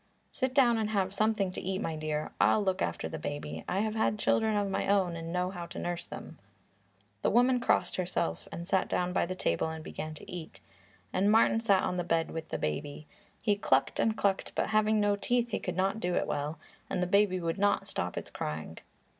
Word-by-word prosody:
"Sit 260 -1 -2
down 240 -5 +5
and 215 -1 0
have 195 -3 0
something 210 -2 +1
to - - -6
eat, 190 +1 -2
my 165 -7 -2
dear. 155 -1 -2
I'll 215 - +4
look 190 -1 0
after - - -1
the 160 - -6
baby. 145 - -5
I 190 - +1
have 215 0 -1
had 220 -1 +1
children 220 0 +2
of 205 -1 +1
my 195 0 -1
own 190 -4 +2
and 165 0 -5
know 180 +1 0
how 175 -3 -6
to - - -9
nurse 175 0 -3
them." 160 - -9 0.8
The - - +2
woman 245 +2 +4
crossed 235 - +1
herself, 175 - -2 0.2
sat 190 +2 +1
down 180 0 0
by 175 - +1
the 185 - -3
table 85 - 0
and 160 0 -6
began 155 0 -6
to - - -11
eat, 175 -3 -7 0.5
and 195 +3 +3
Martin 225 0 +5
sat 200 -5 +3
on 180 - -1
the 175 - 0
bed 165 -2 0
with 160 -1 -5
the - - -2
baby. 145 - -3 0.4
He 210 -3 +3
clucked 135 -9 +1
and 220 -1 +2
clucked, 195 -1 0
but - - 0
having 215 0 +3
no 205 -1 +3
teeth 240 +3 0
he - - 0
could 180 - -4
not 195 +3 +1
do 180 -3 -1
it - - +1
well, 150 +2 -2 0.3
and 180 - 0
the - - +2
baby 195 0 +3
would 170 +2 -2
not 200 -1 +2
stop 90 - -3
its - - -5
crying. 80 +1 -5
185 Hz, 220 wpm, -30 LUFS, 165-210 Hz, 0.8 s, down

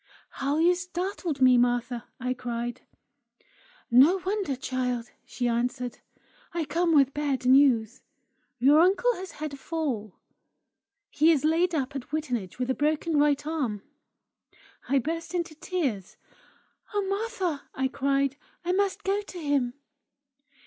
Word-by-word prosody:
"How 280 +2 +1
you 340 +3 +5
startled 360 -3 -4
me, 250 -1 +7
Martha!" 245 -1 0
I 255 0 -1
cried. 240 -1 -4 1.1
"No 275 +10 +7
wonder, 390 -7 -1
child!" 250 -2 -3 0.2
she 245 - -2
answered. 245 +1 -2 0.6
"I 335 -2 0
come 330 +2 +1
with 275 -2 +4
bad 280 -3 -1
news! 255 -3 +4 0.6
Your 280 +5 +5
uncle 390 +8 +4
has 370 0 -8
had 305 -1 -5
a - - -7
fall. 270 - -3 1.0
He 315 +3 +4
is 300 -2 +2
laid 335 +2 +2
up 280 -1 -2
at 270 -1 -6
Wittenage 250 - -3
with 255 +1 -1
a - - +2
broken 305 +2 +1
right 290 0 +2
arm." 265 -11 -2 1.1
I 275 - +3
burst 330 +6 -3
into 340 -2 -2
tears. 290 - -3 0.8
"Oh, 410 - +2
Martha!" 390 - -2
I 265 0 +1
cried; 275 +1 0 0.3
"I 355 - +1
must 390 +1 0
go 395 +2 +1
to 390 -3 -10
him!" 285 -6 0
285 Hz, 135 wpm, -27 LUFS, 250-335 Hz, 1.1 s, me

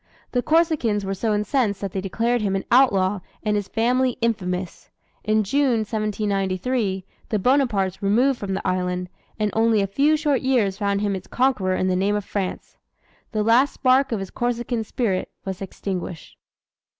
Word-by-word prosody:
The 245 - +1
Corsicans 305 - +2
were 195 - -2
so 215 +3 -1
incensed 210 0 0
that 200 -2 -3
they 190 - -3
declared 230 +5 0
him 195 -2 0
an 195 - -2
outlaw 205 -6 +4 0.2
and 210 -1 +1
his 205 -2 -1
family 250 +4 +1
infamous. 185 -6 -2 0.3
In 215 0 +2
June, 255 +1 +2
1793, 205 -1 -1 0.2
the 215 - +1
Bonapartes 210 -5 +1
removed 240 +6 +2
from 195 -2 -3
the - - -3
island; 180 0 -1 0.3
and 210 -1 0
only 225 -1 +3
a 200 - +2
few 280 +10 +2
short 295 -4 +1
years 225 -7 +1
found 200 -1 0
him 205 -1 0
its 185 - -7
conqueror 245 -8 +1
in 185 - 0
the 185 - +1
name 195 +3 +1
of 205 -2 -2
France. 195 -3 -4 0.6
The 215 -2 0
last 240 +6 +3
spark 265 +1 +3
of 225 - 0
his 195 -1 -6
Corsican 240 -1 -2
spirit 215 -4 -1 0.2
was 190 -1 -5
extinguished. 185 -3 -5
210 Hz, 170 wpm, -23 LUFS, 195-245 Hz, 0.6 s, outlaw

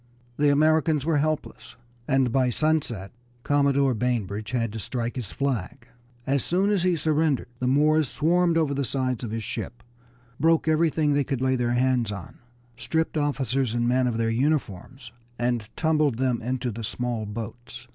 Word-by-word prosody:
The 145 0 +3
Americans 155 0 +3
were 160 -2 +2
helpless, 145 -6 -3 0.3
and 135 -3 +2
by 130 0 +2
sunset 125 -8 -1 0.3
Commodore 140 -2 +2
Bainbridge 110 -3 -2
had 115 -4 -1
to 110 - -5
strike 120 +2 -3
his 120 -7 -5
flag. 125 -2 -3 0.4
As 135 -1 +1
soon 190 +4 +1
as 200 -3 +2
he 180 0 +2
surrendered 155 -3 0
the 125 - -1
Moors 150 +2 +3
swarmed 170 +2 +2
over 155 -3 +1
the 140 0 -1
sides 130 -1 -2
of 115 - -3
his 110 +1 -4
ship, 120 +3 -6 0.6
broke 165 +1 +3
everything 155 -1 +2
they 145 0 +2
could 135 -2 -3
lay 130 0 +1
their 120 -1 0
hands 125 -3 +1
on, 100 -4 -8 0.4
stripped 145 +9 -1
officers 135 -5 0
and 120 0 +1
men 125 +1 +2
of 115 -2 -1
their 115 0 0
uniforms, 130 - -2 0.3
and 120 -3 -1
tumbled 155 -6 +1
them 125 -2 0
into 125 +1 -2
the 115 +2 -7
small 120 -1 -3
boats. 120 +3 -8
130 Hz, 165 wpm, -25 LUFS, 120-150 Hz, 0.6 s, The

